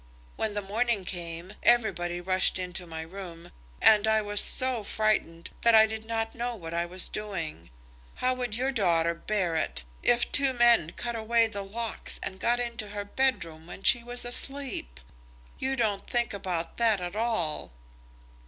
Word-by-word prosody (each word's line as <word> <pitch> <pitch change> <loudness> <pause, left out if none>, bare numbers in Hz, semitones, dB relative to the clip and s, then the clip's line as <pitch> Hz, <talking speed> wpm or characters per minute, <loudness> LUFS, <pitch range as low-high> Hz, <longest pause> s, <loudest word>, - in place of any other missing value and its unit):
When 215 -2 -2
the 205 - -1
morning 215 0 0
came, 170 +1 -6
everybody 195 -7 +2
rushed 185 +1 +2
into 180 -1 -4
my 160 -1 -6
room, 170 -1 -10 0.3
and 215 0 +6
I 220 0 +4
was 205 -1 +1
so 255 -4 +2
frightened 200 -6 0
that 235 -1 +5
I 220 0 +8
did 220 0 -5
not 225 0 -2
know 240 0 -3
what 165 -5 -8
I 170 +1 -1
was 185 +1 -2
doing. 170 - -5 0.5
How 255 0 +1
would 245 -4 -3
your 260 +3 0
daughter 170 -8 +2
bear 180 -1 -1
it, 65 - -1 0.2
if 240 0 +2
two 275 -2 +4
men 235 -9 +4
cut 240 -1 -4
away 230 +1 +3
the 210 -3 -4
locks 220 +4 -3
and 190 - -5
got 240 +4 +2
into 235 -2 -3
her 205 0 -5
bedroom 170 -10 -1
when 185 +2 -10
she 235 - +4
was 245 0 -6
asleep? 245 - -2 0.6
You 265 0 -1
don't 215 -5 -1
think 240 -2 0
about 180 -4 -3
that 225 -4 +3
at 180 +1 -5
all." 215 - -1
210 Hz, 170 wpm, -28 LUFS, 175-235 Hz, 0.6 s, I